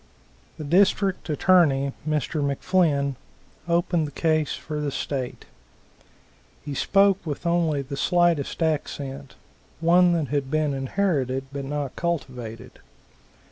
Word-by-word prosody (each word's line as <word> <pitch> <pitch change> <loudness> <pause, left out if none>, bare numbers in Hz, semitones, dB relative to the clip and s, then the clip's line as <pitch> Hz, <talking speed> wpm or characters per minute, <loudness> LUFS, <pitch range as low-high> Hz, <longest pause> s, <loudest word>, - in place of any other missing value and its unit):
The 155 - -6
District 190 +4 +2
Attorney, 145 -4 +3 0.2
Mr. 155 +1 -1
McFlinn, 140 -1 +1 0.5
opened 170 -2 +1
the - - -9
case 155 0 0
for 150 -1 -5
the 150 - -1
state. 130 -2 -4 1.2
He 145 - -4
spoke 195 +6 +3
with 155 0 -5
only 165 -4 +1
the 140 +1 -6
slightest 175 -1 +1
accent, 140 -3 -3 0.4
one 175 +2 +4
that 160 -5 -1
had 140 -2 -1
been 155 -1 0
inherited 135 -2 -1
but 140 -1 -4
not 145 -1 -4
cultivated. 125 -10 -4
150 Hz, 115 wpm, -24 LUFS, 140-170 Hz, 1.2 s, one